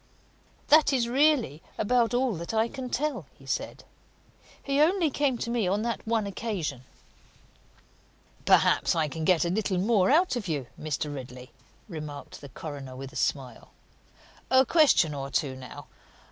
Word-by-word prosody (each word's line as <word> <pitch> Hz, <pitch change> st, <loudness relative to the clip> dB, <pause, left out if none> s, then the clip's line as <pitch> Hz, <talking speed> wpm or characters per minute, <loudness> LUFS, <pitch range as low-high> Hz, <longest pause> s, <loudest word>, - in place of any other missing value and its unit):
"That 310 Hz, 0 st, +6 dB
is 250 Hz, -4 st, +1 dB
really 260 Hz, -, +2 dB, 0.2 s
about 240 Hz, +2 st, +2 dB
all 250 Hz, -1 st, +1 dB
that 170 Hz, +7 st, -5 dB
I 220 Hz, +1 st, +3 dB
can 255 Hz, +1 st, -7 dB
tell," 300 Hz, +4 st, -2 dB
he -, -, -17 dB
said. -, -, -4 dB, 0.8 s
"He 275 Hz, +1 st, +1 dB
only 335 Hz, -1 st, +3 dB
came 270 Hz, -3 st, 0 dB
to 235 Hz, -, -4 dB
me 235 Hz, -5 st, 0 dB
on 200 Hz, +4 st, 0 dB
that 235 Hz, -1 st, -3 dB
one 225 Hz, -2 st, +1 dB
occasion." 190 Hz, -, -4 dB, 1.6 s
"Perhaps -, -, +4 dB
I 160 Hz, -2 st, +1 dB
can 160 Hz, +2 st, -5 dB
get 175 Hz, -2 st, +3 dB
a 170 Hz, -, 0 dB
little 200 Hz, -1 st, -1 dB
more 195 Hz, 0 st, +2 dB
out 330 Hz, +2 st, +3 dB
of 225 Hz, -6 st, -4 dB
you, 145 Hz, -6 st, -2 dB
Mr. 150 Hz, -1 st, -3 dB
Ridley," 125 Hz, -2 st, -9 dB, 0.4 s
remarked 150 Hz, -5 st, -8 dB
the 140 Hz, -, -10 dB
coroner 140 Hz, -2 st, -8 dB
with 135 Hz, +2 st, -8 dB
a -, -, -14 dB
smile. 135 Hz, -3 st, -3 dB, 0.8 s
"A 260 Hz, 0 st, +5 dB
question 270 Hz, -, +4 dB
or 135 Hz, -1 st, -5 dB
two, 140 Hz, -2 st, -1 dB
now. 130 Hz, -2 st, -10 dB
200 Hz, 160 wpm, -27 LUFS, -, 1.6 s, That